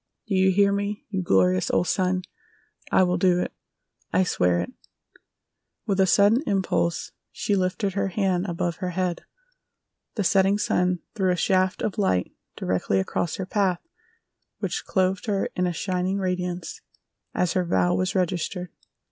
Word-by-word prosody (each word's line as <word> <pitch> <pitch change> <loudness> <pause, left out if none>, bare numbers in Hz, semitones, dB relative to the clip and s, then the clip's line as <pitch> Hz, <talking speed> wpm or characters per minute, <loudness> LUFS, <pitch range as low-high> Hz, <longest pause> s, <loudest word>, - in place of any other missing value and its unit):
Do 220 - -3
you 190 0 +4
hear 200 +1 +4
me, 200 +1 -2
you 190 -2 -1
glorious 95 - +2
old 180 - +1
sun? 185 -1 +1 0.7
I - - +5
will 180 -1 +1
do 180 -1 +3
it! - - -3 0.6
I 185 - +3
swear 90 - +1
it!" 90 - -4 1.1
With 195 -1 0
a 190 - +5
sudden 205 +7 +5
impulse 170 -4 0 0.2
she 205 - -1
lifted 190 +1 0
her 195 0 0
hand 190 -1 0
above 170 -1 -2
her 185 -2 -3
head. 180 -2 -1 0.9
The 210 - 0
setting 195 +1 +3
sun 180 -3 +1
threw 190 -4 +1
a 180 - +3
shaft 185 +1 +1
of 210 - -2
light 95 - +1 0.2
directly 95 +1 0
across 155 - -1
her 190 - -4
path 190 - 0 0.7
which - - -3
clothed 190 +3 0
her 200 -2 0
in 180 0 +1
a - - 0
shining 185 +2 -1
radiance 180 -2 -3 0.5
as 175 -2 +1
her 185 - +1
vow 90 - +2
was 95 0 0
registered. 180 0 -1
185 Hz, 155 wpm, -25 LUFS, 175-195 Hz, 1.1 s, I